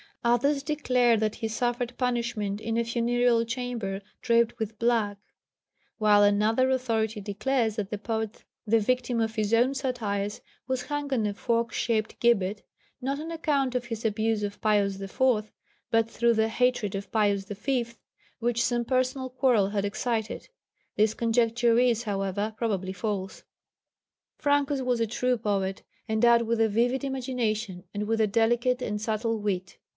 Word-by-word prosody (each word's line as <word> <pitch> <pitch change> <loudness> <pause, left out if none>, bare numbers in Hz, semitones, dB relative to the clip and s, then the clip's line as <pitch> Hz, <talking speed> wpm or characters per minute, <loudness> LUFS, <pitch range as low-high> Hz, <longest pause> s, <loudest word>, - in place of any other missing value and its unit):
Others 245 +5 +2
declare 250 -6 +2
that 215 0 0
he 225 - -3
suffered 240 +2 -2
punishment 235 -5 -1
in 225 +1 -2
a 235 - +2
funereal 235 0 +2
chamber 230 -5 -3 0.2
draped 235 -1 +2
with 220 -1 -4
black; 225 -3 +1 0.8
while 210 -2 +5
another 215 +5 +3
authority 225 -4 0
declares 220 +3 0
that 205 -3 -3
the 210 - -3
poet, 220 +1 -4 0.2
the 225 +1 +3
victim 245 +1 0
of 225 -1 0
his 215 -2 -1
own 240 +4 +4
satires, 215 -7 -2 0.3
was 260 -1 -1
hung 290 -1 -4
on 235 -5 +1
a 205 - -1
fork 230 +2 0
shaped 220 -2 -1
gibbet, 210 -4 +2 0.4
not 270 +2 -2
on 320 +2 -5
account 285 -5 0
of 250 -1 -1
his 230 -1 -5
abuse 220 0 0
of 205 0 -5
Pius 200 -2 +2
IV., 215 +2 0 0.4
but 225 0 +2
through 235 0 +2
the 220 0 +2
hatred 245 -3 +1
of 200 0 -5
Pius 205 -3 +1
V., 235 +5 -1 0.5
which 235 0 +1
some 240 -1 0
personal 255 +1 0
quarrel 250 -6 +2
had 205 -1 -1
excited. 220 +1 -3 0.5
This 215 +1 +2
conjecture 230 0 +2
is, 240 -2 +2
however, 200 0 -2
probably 195 -5 -1
false. 195 -2 -4 1.0
Francus 285 -1 +1
was 250 -2 +1
a 230 - +1
true 250 +3 0
poet, 195 -3 -2 0.3
endowed 235 +2 +4
with 230 0 0
a 220 - +4
vivid 245 +6 +1
imagination 230 -8 -2
and 210 0 -3
with 225 0 +1
a 215 - +4
delicate 240 +4 +2
and 210 0 -3
subtle 220 +1 -1
wit. 185 -3 -3
230 Hz, 155 wpm, -27 LUFS, 210-245 Hz, 1.0 s, while